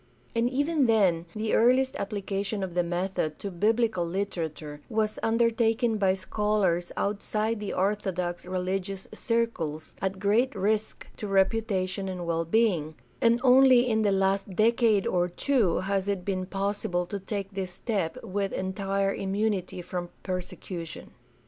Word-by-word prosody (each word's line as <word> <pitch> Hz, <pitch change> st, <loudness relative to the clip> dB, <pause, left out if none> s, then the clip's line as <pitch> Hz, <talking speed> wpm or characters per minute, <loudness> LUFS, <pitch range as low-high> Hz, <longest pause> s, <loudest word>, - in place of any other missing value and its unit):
And 230 Hz, +1 st, +2 dB
even 285 Hz, +1 st, +1 dB
then 185 Hz, -7 st, +3 dB
the 215 Hz, 0 st, -1 dB
earliest 255 Hz, +3 st, +4 dB
application 200 Hz, 0 st, -3 dB
of 185 Hz, -2 st, -4 dB
the 175 Hz, -, +2 dB
method 175 Hz, -2 st, -2 dB
to 200 Hz, -, -5 dB
biblical 215 Hz, +1 st, +1 dB
literature 165 Hz, -5 st, -4 dB
was 215 Hz, -1 st, 0 dB
undertaken 230 Hz, 0 st, +2 dB
by 190 Hz, -2 st, +3 dB
scholars 190 Hz, -3 st, 0 dB
outside 210 Hz, +2 st, -1 dB
of 205 Hz, -, -4 dB
orthodox 185 Hz, -3 st, -1 dB
religious 185 Hz, +1 st, -3 dB
circles 215 Hz, -10 st, -2 dB
at 190 Hz, 0 st, -1 dB
great 215 Hz, +6 st, +2 dB
risk 210 Hz, +2 st, -1 dB
to 210 Hz, -, -5 dB
reputation 195 Hz, -1 st, +1 dB
and 180 Hz, -2 st, -4 dB
well 165 Hz, 0 st, 0 dB
being; 170 Hz, -6 st, +1 dB, 0.3 s
and 235 Hz, 0 st, +4 dB
only 255 Hz, -1 st, +6 dB
in 220 Hz, -2 st, +2 dB
the 205 Hz, -2 st, +3 dB
last 195 Hz, 0 st, +1 dB
decade 220 Hz, -1 st, +3 dB
or 180 Hz, 0 st, +1 dB
two 220 Hz, -1 st, +1 dB
has 195 Hz, 0 st, -1 dB
it 195 Hz, -3 st, -2 dB
been 185 Hz, -2 st, -2 dB
possible 195 Hz, -2 st, -1 dB
to 200 Hz, +3 st, -5 dB
take 195 Hz, 0 st, -5 dB
this 190 Hz, -2 st, -3 dB
step 190 Hz, -2 st, -2 dB
with 195 Hz, +1 st, -2 dB
entire 195 Hz, +1 st, -1 dB
immunity 195 Hz, -2 st, -1 dB
from 175 Hz, 0 st, -4 dB
persecution. 180 Hz, -2 st, -6 dB
195 Hz, 140 wpm, -27 LUFS, 185-220 Hz, 0.3 s, only